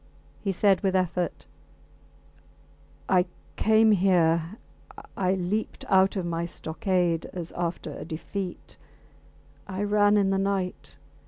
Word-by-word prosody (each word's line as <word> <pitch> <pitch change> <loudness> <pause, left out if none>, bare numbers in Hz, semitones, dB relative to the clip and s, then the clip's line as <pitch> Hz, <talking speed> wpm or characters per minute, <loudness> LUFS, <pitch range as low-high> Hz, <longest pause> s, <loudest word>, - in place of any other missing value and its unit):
He 200 - -1
said 195 0 +3
with 190 -2 +1
effort 180 -1 -1 1.6
I 180 -1 +3 0.3
came 220 0 +4
here... 175 -2 +2 0.6
I 185 0 +1
leaped 190 +4 -3
out 190 +1 +4
of 190 -3 -2
my 170 0 -2
stockade 170 0 -1
as 170 -2 -5
after 170 -3 -4
a - - -7
defeat. 180 +3 -6 0.9
I 195 +1 -3
ran 205 0 +4
in 195 -1 +2
the 195 - +1
night. 195 -2 -2
185 Hz, 115 wpm, -26 LUFS, 175-200 Hz, 1.6 s, came